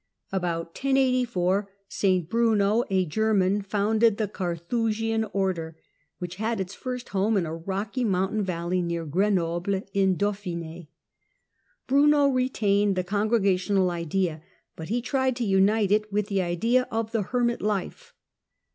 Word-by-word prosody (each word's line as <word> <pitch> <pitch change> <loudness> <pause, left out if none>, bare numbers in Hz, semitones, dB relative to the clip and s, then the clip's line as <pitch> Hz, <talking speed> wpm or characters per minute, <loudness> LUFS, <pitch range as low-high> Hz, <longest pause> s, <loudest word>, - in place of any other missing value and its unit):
About 175 -3 -2
1084 245 -6 +1 0.2
St 185 -4 +1
Bruno, 220 0 +2
a 190 -1 +2
German, 200 +2 +1
founded 210 +2 +2
the 215 - 0
Carthusian 220 +5 -1
Order, 185 -6 -2 0.4
which 180 0 -6
had 220 +1 -1
its 190 0 -4
first 250 -1 -6
home 205 +2 +1
in 180 - +1
a 160 - -5
rocky 200 +8 -3
mountain 195 0 0
valley 180 -1 -1
near 170 -1 -3
Grenoble 185 +2 0
in 190 -2 +2
Dauphine. 175 -5 -4 1.0
Bruno 285 +1 +4
retained 210 -6 +1
the 185 - 0
congregational 200 -2 +1
idea, 170 -1 -2 0.3
but 160 +1 -8
he 235 +2 -1
tried 260 -1 0
to 240 -1 -2
unite 200 +1 +3
it 215 0 +1
with 205 +1 -1
the 195 -2 +1
idea 230 +9 +1
of 225 0 -2
the 225 -2 0
hermit 240 +3 0
life. 205 -3 -3
200 Hz, 135 wpm, -26 LUFS, 180-225 Hz, 1.0 s, Bruno